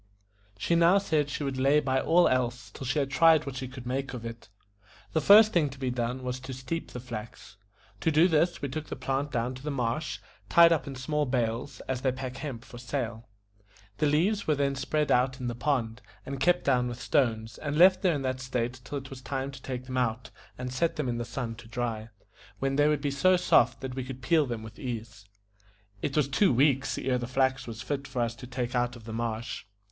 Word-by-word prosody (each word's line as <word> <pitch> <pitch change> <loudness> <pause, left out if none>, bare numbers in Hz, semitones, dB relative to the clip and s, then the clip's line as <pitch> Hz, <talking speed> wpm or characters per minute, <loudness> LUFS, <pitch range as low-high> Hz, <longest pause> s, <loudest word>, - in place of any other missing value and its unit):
She 140 - 0
now 170 +3 +5
said 155 -7 +1
she 145 - -3
would 135 -2 -2
lay 140 +3 +4
by 130 -2 +1
all 175 +2 +4
else 120 -4 -1
till 130 - -7
she 135 - 0
had 135 -2 0
tried 160 +2 +5
what 140 -2 -5
she 130 - -4
could 130 -1 -10
make 135 +1 -3
of 115 -2 -7
it. 115 0 -8 0.6
The 160 - +2
first 210 +6 +8
thing 155 -5 +3
to 135 - -11
be 130 -2 -2
done 125 +1 -2
was 125 0 -3
to 130 0 -7
steep 130 +6 -4
the 125 - -7
flax. 115 -4 -8 0.4
To - - +1
do 160 +3 +5
this 170 -1 +1
we 140 - -1
took 155 +3 -5
the - - -5
plant 135 +2 -2
down 120 +2 -1
to 130 - -10
the 150 - -4
marsh, 135 +2 -2 0.3
tied 170 0 +7
up 160 -4 +1
in 135 - -5
small 150 +3 -1
bales, 125 +2 -2
as 130 -1 -3
they 130 - +2
pack 130 0 -6
hemp 135 -5 -6
for 120 - -11
sale. 120 -3 -4 0.7
The 150 - +3
leaves 185 +8 +1
were 155 - +3
then 140 -1 +1
spread 150 +3 -1
out 130 +1 +2
in 125 - -5
the 120 - -1
pond, 120 -2 -1 0.2
and 135 0 -5
kept 175 +5 +3
down 125 -3 +2
with 120 0 -5
stones, 110 -7 0
and 145 -1 -3
left 185 +2 +7
there 180 -5 +3
in 140 - -3
that 130 0 -2
state 125 0 -3
till 145 - -5
it 135 -1 -8
was 130 -1 -8
time 135 0 -3
to 135 -1 -11
take 125 -1 -5
them 130 0 -4
out 115 -1 -1 0.3
and 125 0 -5
set 165 +6 0
them 145 -5 -2
in 120 -1 -2
the 120 - -3
sun 120 -3 -4
to 120 - -12
dry, 115 -1 -3 0.5
when 135 0 -1
they 145 +1 +4
would 150 -2 +1
be 145 - -1
so 185 +7 +4
soft 125 -9 +3
that 130 -1 -5
we 130 0 -3
could 130 0 -8
peel 155 0 +3
them 115 -3 -4
with 110 - -11
ease. 115 -5 -6 0.8
It 140 - -2
was 150 -3 +3
two 165 +7 +3
weeks 135 +1 +2
ere 125 -1 0
the 120 - -4
flax 130 0 +1
was 115 +1 -6
fit 140 +1 -3
for 120 - -1
us 115 0 -2
to 125 - -9
take 125 -1 -3
out 120 0 0
of 120 - -12
the 110 0 -7
marsh. 115 +1 -3
130 Hz, 235 wpm, -28 LUFS, 120-145 Hz, 0.8 s, first